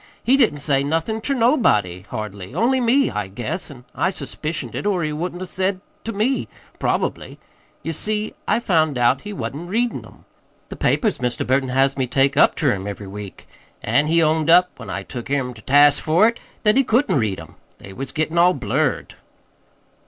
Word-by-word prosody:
"He 255 - +4
didn't 155 - +3
say 140 -1 +1
nothin' 165 +10 -1
ter 275 +4 -1
nobody, 105 - +2
hardly, 100 -3 -6
only 255 +3 +2
me, 260 +4 +3
I 105 -2 -3
guess, 125 - -4
an' 125 -4 -13
I - - 0
suspicioned 165 -3 -5
it, - - -3
or 185 -4 +1
he 150 0 -2
wouldn't 175 +3 -4
'a' - - -4
said 190 +2 -1
it 185 - -21 0.2
to 225 - -2
me, 225 +6 0 0.3
probably. - - -2 0.5
Ye 165 - -3
see, 210 +6 0
I - - +2
found 160 - +1
out 120 +2 +2
he 210 - -7
wa'n't 145 - -5
readin' 235 +4 -1
'em - - -17 0.4
the - - -7
papers 215 -5 +1
Mr. 125 -2 -2
Burton 130 0 +1
has 135 +2 +2
me 130 -2 0
take 135 +3 +2
up - - +4
ter 140 -6 +2
him 95 0 -5
every 100 0 -6
week. 100 0 -9 0.4
An' 145 +2 +2
he 165 +1 +3
owned 155 0 +1
up, 180 +2 +6
when - - -9
I - - -4
took 120 -2 -7
him 135 -3 -1
ter 110 - -14
task 145 +3 +5
for 170 +8 +4
it, 230 - -7 0.2
that 210 +2 +4
he 270 - +5
couldn't 245 - +2
read 105 -5 -1
'em. 80 - -12 0.2
They 95 - -12
was 135 +5 -6
gettin' 160 +2 -1
all 180 +1 +5
blurred." 135 +4 -1
155 Hz, 200 wpm, -21 LUFS, 125-200 Hz, 0.5 s, up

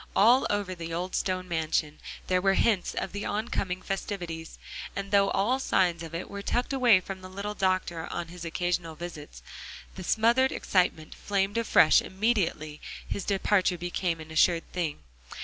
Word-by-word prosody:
All 240 +6 +5
over 205 -2 -1
the 165 -2 -7
old 175 +3 -3
stone 185 -1 -1
mansion 155 -2 -1 0.3
there 185 0 +1
were 195 0 +3
hints 205 -6 +1
of - - -3
the 205 +1 -5
on 215 +3 -2
coming 185 -1 -2
festivities; 175 -5 -5 0.4
and 200 0 -4
though 200 -1 +4
all 235 +7 +1
signs 175 -9 +1
of 165 0 -7
it 170 - -4
were 200 0 -6
tucked 245 +6 -1
away 245 -7 +5
from 190 +1 -7
the 185 - -9
little 200 +2 -4
doctor 185 -4 -1
on 170 - -4
his 175 0 -9
occasional 170 -1 -2
visits, 155 -3 -9 0.5
the 190 - -8
smothered 235 +7 +3
excitement 175 -4 0
flamed 200 +2 -1
afresh 200 -8 +5
immediately 190 -7 -1 0.3
his 200 - -3
departure 195 -2 +2
became 175 -1 -2
an 160 0 -10
assured 165 +1 +3
thing. 160 - -3
185 Hz, 165 wpm, -28 LUFS, 170-200 Hz, 0.5 s, All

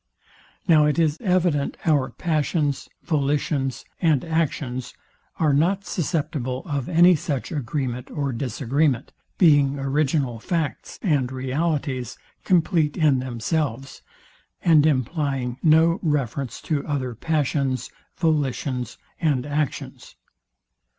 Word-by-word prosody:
Now 155 -3 +6
it 150 - 0
is 160 -2 +2
evident 180 -8 +1
our 145 -5 +2
passions, 155 -3 -1
volitions, 140 -3 -1 0.2
and 160 -6 +2
actions, 145 -6 -2 0.4
are 155 -3 +2
not 185 +7 +2
susceptible 150 -7 -2
of 140 -3 -3
any 175 +1 +6
such 145 -1 -3
agreement 130 -3 -3
or 140 -3 -2
disagreement; 135 +2 0 0.3
being 145 -5 +4
original 135 -3 0
facts 165 - -3
and 145 - +1
realities, 130 -1 -2 0.3
compleat 165 -4 +2
in 150 -6 +3
themselves, 130 +1 -3 0.6
and 155 -3 +5
implying 135 -2 -1
no 165 +1 +4
reference 140 -4 -2
to 150 -3 -1
other 135 -4 -2
passions, 140 -1 -1 0.3
volitions, 140 -5 -1 0.2
and 145 -7 +1
actions. 145 0 -4
145 Hz, 105 wpm, -23 LUFS, 130-160 Hz, 0.6 s, Now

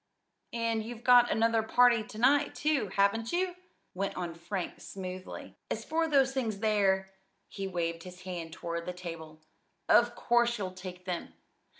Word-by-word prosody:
"And 230 -1 0
you've 235 +1 -8
got 245 -1 +7
another 230 0 +3
party 240 +1 +4
to 215 - -11
night, 280 +5 +3
too; 300 -7 +1
haven't 200 +4 +1
you?" 360 0 0 0.4
went 195 +2 -3
on 175 -2 -3
Frank 175 +3 -5
smoothly. 185 -1 -7
"As - - -3
for 325 +1 +1
those 270 -3 +3
things 230 -6 -1
there" 195 -3 +2 0.4
he 195 -1 -5
waved 170 -2 -2
his 180 +1 -11
hand 175 -3 -5
toward 170 +1 -5
the 180 - -3
table 165 -3 -8 0.5
"of 240 0 +5
course 240 0 +2
you'll 190 -3 -3
take 180 -1 -9
them. 180 -2 -4
200 Hz, 160 wpm, -30 LUFS, 180-240 Hz, 0.5 s, got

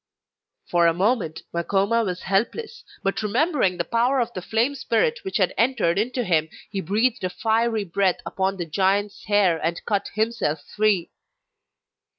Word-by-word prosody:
For 170 -1 +3
a 165 - +2
moment 190 -4 0
Makoma 200 +6 +1
was 180 -3 -4
helpless, 435 - -1 0.2
but 195 +2 0
remembering 215 - +1
the - - 0
power 245 +3 +1
of 240 -1 -1
the 185 - -5
flame 225 +8 0
spirit 470 - 0
which 385 - -2
had 185 -4 +1
entered 225 -7 +2
into 250 +3 -1
him, 160 -5 +1 0.2
he 195 -2 -2
breathed 215 +6 0
a 185 - 0
fiery 225 +2 0
breath 190 0 +1
upon 190 0 -1
the 175 - -3
giant's 195 +5 0
hair 195 -6 +2
and 165 +1 -2
cut 200 -2 0
himself 215 -9 -1
free. 205 -3 0
205 Hz, 160 wpm, -23 LUFS, 180-235 Hz, 0.2 s, For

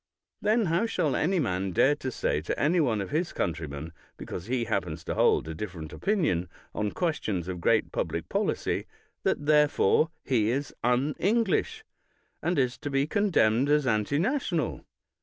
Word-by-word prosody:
Then 220 +1 +2
how 170 +7 +1
shall 150 - 0
any 185 +4 +1
man 95 - -1
dare 140 +11 +4
to 130 - -4
say 75 - -1
to 80 - -3
any 165 +5 +3
one 115 -9 +1
of 100 - -6
his 160 +4 0
country 80 -1 -2
men, 75 +4 -7 0.2
because 90 +3 -7
he 125 0 0
happens 85 -7 -2
to - - -3
hold - - +3
a 80 - -4
different 80 -3 -7
opinion 155 - 0 0.2
on 105 -1 -1
questions 110 - -1
of 90 -2 -5
great - - +2
public - - -3
policy, - - -1 0.3
that 145 - 0
therefore 150 +1 +4
he 115 -5 +1
is 135 +4 -2
unEnglish, 195 - +1 0.6
and 175 +1 0
is 125 -2 +1
to 145 - -4
be 135 0 +1
condemned 145 - +2
as 150 -1 +3
antinational? 150 - 0
135 Hz, 160 wpm, -28 LUFS, -, 0.6 s, dare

